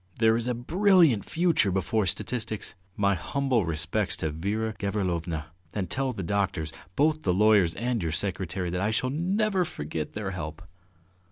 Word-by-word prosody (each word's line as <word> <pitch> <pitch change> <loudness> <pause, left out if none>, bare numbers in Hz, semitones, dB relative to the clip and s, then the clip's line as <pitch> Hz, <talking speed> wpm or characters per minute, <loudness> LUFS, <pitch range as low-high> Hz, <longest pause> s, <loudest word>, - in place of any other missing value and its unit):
There 110 0 +4
is 115 +1 -1
a 125 - 0
brilliant 165 - +4
future 165 - +2
before 95 +3 0
statistics! 110 +2 -3 0.2
My 100 -1 +3
humble 125 - 0
respects 75 -3 -1
to 80 - -2
Vera 105 +8 -2
Gavrilovna, 85 -6 -2 0.2
and 95 -5 -2
tell 135 -1 0
the 100 -6 -5
doctors, 85 -4 -1 0.2
both 155 +2 +2
the 90 - +1
lawyers 100 -4 +4
and 120 0 -1
your 80 -2 -1
secretary, 90 +1 -2
that 90 +1 -1
I 105 - +1
shall 130 +3 0
never 190 +5 +1
forget 75 - -5
their 105 -2 -3
help! 80 -2 -6
105 Hz, 160 wpm, -27 LUFS, 90-125 Hz, 0.2 s, There